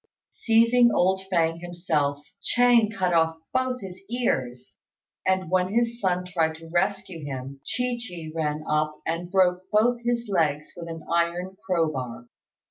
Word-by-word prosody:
Seizing 235 +1 +4
old 190 0 +2
Fêng 165 -1 +1
himself, 155 -5 -1 0.2
Ch'êng 240 -3 +4
cut 185 -4 0
off 165 -1 +3 0.2
both 255 -1 0
his 190 -1 -9
ears; 130 - -2 0.5
and 185 -2 +1
when 185 0 +2
his 235 0 +1
son 180 -2 +1
tried 165 -3 0
to 165 0 -12
rescue 175 -1 -1
him, 135 -1 -6
Chi 250 -1 -1
chi 175 -9 -7
ran 155 -1 -2
up 150 0 0
and 170 +2 -2
broke 180 -1 +3
both 235 +3 +3
his 240 -1 -1
legs 155 -6 0
with 170 -1 -8
an 165 -1 -7
iron 170 +2 0
crowbar. 155 -10 -1
175 Hz, 145 wpm, -25 LUFS, 160-210 Hz, 0.5 s, Seizing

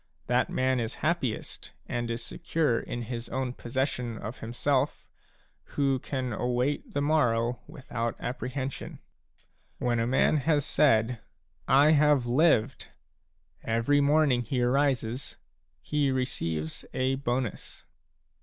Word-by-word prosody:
That 125 +1 +1
man 130 0 +1
is 115 -2 -3
happiest, 150 -9 -2
and 120 0 -3
is 115 0 -3
secure 150 -8 0
in 120 0 -5
his 115 0 -6
own 130 -2 -2
possession 125 -2 -2
of 110 +3 -7
himself, 130 +4 -1 0.7
who 135 -2 +2
can 130 -2 -3
await 125 +6 -1
the 145 - +1
morrow 120 -6 +2
without 125 -6 -4
apprehension. 130 +1 -4 0.8
When 120 -1 0
a 115 - +1
man 135 +4 +3
has 145 0 +1
said: 115 -4 +3 0.3
" - - -40 0.2
I 155 - +6
have 150 -4 +4
lived! 130 -1 +2 0.8
every 115 +6 +2
morning 140 -3 +3
he 120 +2 -1
arises 130 -1 0 0.5
he 145 -2 +1
receives 80 -12 -2
a 130 +1 +1
bonus. 125 -4 -3
130 Hz, 120 wpm, -28 LUFS, 120-140 Hz, 0.8 s, I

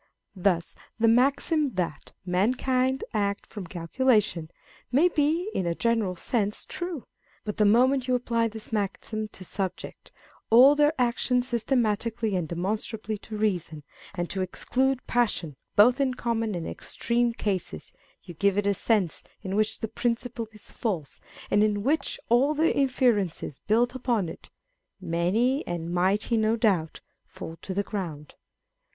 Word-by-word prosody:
Thus, 180 -2 0 0.2
the 230 0 +3
maxim 280 +6 +3
that 180 -2 -3
a - - -21
mankind 255 +6 +1
act 200 -2 -1
from 200 -5 -8
calculation 175 -1 +1 0.2
" - - -28
may 300 +8 +5
be, 330 +5 +1
in 180 - -1
a 170 - 0
general 225 -5 0
sense, 210 +2 -1
true: 345 -6 -5 0.4
but 210 -2 -4
the 210 - +4
moment 255 +4 +4
you 255 - +2
apply 230 -2 +1
this 220 0 -8
maxim 215 +1 -2
to 190 -3 -11
subject 190 0 -5 0.4
all 255 +5 +8
their 295 +1 +3
actions 245 0 +1
systematically 230 -3 0
and 175 -3 -1
demonstrably 210 +4 -3
to 215 0 -7
reason, 175 -8 -1 0.3
and 175 -1 -2
to 190 - -2
exclude 260 +8 0
passion 210 - 0 0.2
both 240 +6 +6
in 260 -2 +1
common 225 -4 -1
and 170 -2 -4
in - - -4
extreme 240 0 0
cases, 190 - -3 0.3
you 175 - -10
give 200 +4 +1
it 205 - +1
a 200 - +3
sense 200 -4 0 0.2
in 190 0 -3
which 215 +1 0
the 220 - -1
principle 235 +1 -2
is 215 -1 -11
false, 180 - -3 0.3
and 205 - +4
in 205 -1 +1
which 305 +6 0
all 265 +6 +3
the 320 +2 +2
inferences 235 - +1
built 235 +3 +3
upon 235 -8 0
it - - -11 0.5
(many 190 - +1
and 170 -1 -3
mighty, 195 +6 +2
no 220 +1 +2
doubt,) 195 -9 0 0.3
fall 165 - -8
to 190 - -5
the 200 - +1
ground. 165 -9 -5
220 Hz, 155 wpm, -27 LUFS, 190-245 Hz, 0.5 s, all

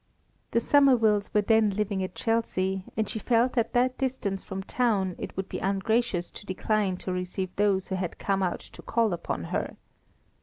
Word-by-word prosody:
The 230 - +2
Somervilles 230 -7 +4
were 210 - +3
then 220 0 +4
living 200 -1 -1
at 185 - -5
Chelsea, 190 -5 0
and 220 - +1
she 220 - -4
felt 235 +3 +2
at 235 -2 +1
that 255 +1 +2
distance 245 -7 -1
from 190 0 -6
town, 205 -5 +1
it - - -6
would 190 0 -2
be - - -5
ungracious 195 -1 0
to - - -10
decline 195 0 0
to 185 - -4
receive 180 0 -3
those 200 -2 +1
who 190 - -1
had 180 -2 -3
come 195 -1 0
out 180 -2 -1
to - - -13
call 230 -4 +1
upon 170 - -3
her. - - -2
205 Hz, 185 wpm, -27 LUFS, 190-230 Hz, -, Somervilles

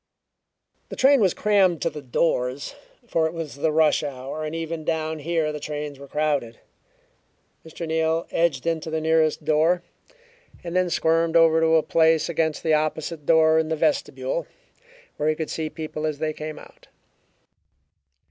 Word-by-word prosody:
The - - -6
train 270 -1 +5
was 190 -4 +2
crammed 195 -5 +3
to - - +1
the 150 - -8
doors, 130 - -1 0.3
for 165 -8 +1
it 160 - -6
was 165 -3 -5
the 155 +2 +1
rush 155 0 +3
hour 140 +1 -5
and 155 +1 -4
even 165 -1 -4
down 160 0 -2
here 160 0 -1
the 150 - -6
trains 150 -1 -5
were 140 - -11
crowded. 145 -5 -1 1.1
Mr. 165 +1 -7
Neal 160 +1 0
edged 165 -5 0
into 165 -1 -1
the 160 0 -1
nearest 160 -1 +1
door 160 +3 +2 0.8
and 170 0 -6
then 185 -1 +2
squirmed 165 0 +1
over 165 -1 +5
to 160 0 +4
a 160 - +4
place 160 -1 +3
against 160 -2 -1
the 160 - +2
opposite 155 0 -2
door 160 -1 +5
in 160 0 -1
the 160 - 0
vestibule, 305 - -1 0.7
where 150 +1 0
he 155 - +1
could 160 0 -4
see 160 -1 -3
people 155 0 -5
as 150 -2 -3
they 155 +1 -2
came 155 0 -7
out. - - -15
160 Hz, 165 wpm, -24 LUFS, 155-165 Hz, 1.1 s, train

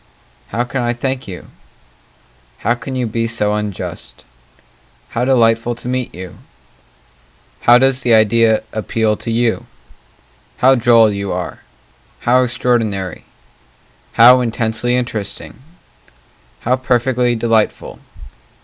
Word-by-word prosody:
How 115 +4 -2
can 125 +1 -4
I 120 0 0
thank 130 +2 -4
you? 90 -2 -8 1.2
How 120 - +3
can 130 +2 -7
you 125 -1 -1
be 115 +1 -2
so 105 -2 0
unjust? 105 -2 -6 0.8
How 120 +1 -2
delightful 120 -2 +2
to 120 - -8
meet 125 -1 -2
you 90 0 -9 1.2
How 120 0 +6
does 135 +1 +2
the 120 - 0
idea 110 +1 +3
appeal 110 0 0
to - - -6
you? 115 0 0 0.9
How 130 +1 +5
droll 115 -3 +4
you 100 -1 -4
are! - - -5 0.6
How 125 +2 +3
extraordinary! 115 -7 -1 0.9
How 125 +2 +7
intensely 115 0 -1
interesting! 120 -4 -4 1.0
How 125 +2 +1
perfectly 125 -1 +1
delightful! 115 -1 -1
120 Hz, 115 wpm, -17 LUFS, 110-125 Hz, 1.2 s, How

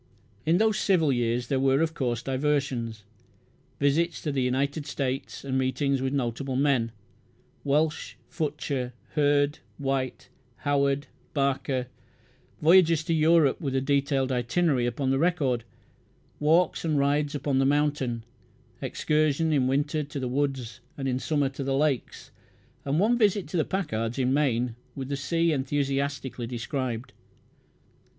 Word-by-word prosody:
In 165 +2 +4
those 220 0 +2
civil 165 -8 +3
years 120 0 0
there 135 +1 0
were, 135 0 +3
of 160 0 +1
course, 120 -5 -2
diversions: 130 -5 -1 0.8
visits 155 +4 +1
to 150 - -1
the 135 -2 0
United 140 +4 -1
States 135 -1 -3
and 130 -1 0
meetings 135 +1 0
with 130 0 -1
notable 130 0 -2
men 130 -4 +2 0.7
Welch, 150 +2 0
Futcher, 140 -5 -3 0.2
Hurd, 145 -1 +2 0.2
White, 135 -2 -2 0.4
Howard, 140 0 +2 0.3
Barker: 135 -2 0 0.8
voyages 165 -1 +5
to 165 - -1
Europe 160 -2 +4
with 135 -4 -2
a - - +3
detailed 135 0 +1
itinerary 125 +1 +1
upon 130 +2 -1
the 135 - +2
record; 140 -9 +1 0.7
walks 165 +4 +3
and 155 -3 +1
rides 145 +1 +1
upon 140 -1 0
the 135 - +3
mountain; 145 -5 0 0.6
excursion 155 +1 +1
in 130 -3 +2
winter 145 +3 0
to 145 -1 -5
the 130 - -2
woods, 130 -3 -2 0.2
and 135 -1 -3
in 130 -1 0
summer 145 -1 0
to 135 +1 -6
the 135 0 0
lakes; 145 -4 -1 0.5
and 140 +3 +1
one 235 +5 +3
visit 205 -5 +2
to - - -5
the 160 - +3
Packards 120 - -2
in 130 0 +1
Maine, 125 -5 +1 0.2
with 135 -1 -5
the 140 - -1
sea 165 +4 +1
enthusiastically 140 -2 -2
described. 125 0 -4
140 Hz, 140 wpm, -27 LUFS, 130-150 Hz, 0.8 s, voyages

